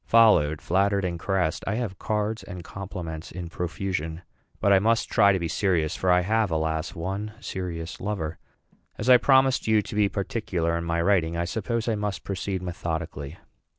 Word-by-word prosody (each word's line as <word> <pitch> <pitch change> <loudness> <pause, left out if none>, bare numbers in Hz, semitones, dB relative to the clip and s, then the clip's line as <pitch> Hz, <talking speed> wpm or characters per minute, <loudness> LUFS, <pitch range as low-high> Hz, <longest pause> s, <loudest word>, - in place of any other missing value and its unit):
Followed, 105 -10 +5
flattered, 100 +2 +2
and 85 -2 -3
caressed, 90 -3 0
I 100 - 0
have 110 -6 -3
cards 110 +1 -1
and 90 -3 -8
compliments 85 -4 -7
in 85 -1 -6
profusion. 85 -1 -3 0.4
But 100 - +4
I 95 - +6
must 115 +3 +1
try 100 -3 +6
to 95 - +2
be 85 -2 -2
serious; 85 -3 +1
for 95 - -1
I 90 0 +5
have, 110 +2 +1
alas! 80 +1 -1
one 95 +5 -4
serious 85 -6 -5
lover. 90 -6 -3 0.6
As 125 +4 +2
I 125 - +10
promised 130 0 +3
you 110 -1 +4
to - - -8
be 105 -1 +3
particular 95 -5 -1
in 85 0 -2
my 85 0 0
writing, 85 -3 +2
I 85 - 0
suppose 110 +5 -2
I 115 - +2
must 105 -2 -3
proceed 95 -1 -3
methodically. 85 -3 -4
95 Hz, 180 wpm, -26 LUFS, 85-105 Hz, 0.6 s, I